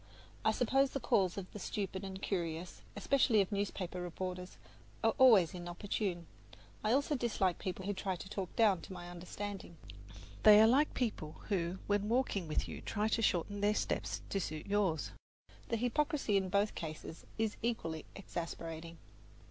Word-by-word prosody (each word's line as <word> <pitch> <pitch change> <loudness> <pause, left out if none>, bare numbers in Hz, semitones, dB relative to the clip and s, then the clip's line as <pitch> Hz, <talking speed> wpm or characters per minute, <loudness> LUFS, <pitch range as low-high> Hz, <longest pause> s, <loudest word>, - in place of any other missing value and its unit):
I - - +4
suppose 265 +4 +3
the 275 - -3
calls 190 -6 +2
of 185 -2 -6
the 210 - -7
stupid 190 -1 -3
and 190 -1 -5
curious, 170 -3 -3
especially 230 +1 +3
of 195 0 +2
newspaper 195 -3 -2
reporters, 180 +1 -5 0.5
are - - +4
always 215 -10 +7
inopportune. 175 0 -3 0.6
I 215 - +2
also 285 +4 +2
dislike 210 -8 0
people 185 -1 -4
who 205 - 0
try 190 -1 -2
to 180 - -8
talk 190 -2 -5
down 210 -6 +4
to 195 - -9
my 175 -1 -8
understanding. 180 0 -6 0.6
They 210 -1 +9
are 220 - +8
like 270 +7 +4
people 205 -11 -2
who 180 -2 0
when 205 0 +1
walking 230 -7 +1
with 155 - -1
you - - -7
try 215 0 -1
to 225 - +1
shorten 205 0 +1
their 210 +1 +3
steps - - -1
to 195 - +1
suit 155 -4 -4
yours; 200 -6 +1 0.6
the 230 - +1
hypocrisy 255 0 +1
in 190 -1 +2
both 200 +2 +2
cases 160 0 -7
is 220 -1 0
equally 165 -9 -2
exasperating. 165 -3 -6
195 Hz, 165 wpm, -35 LUFS, 175-215 Hz, 0.6 s, They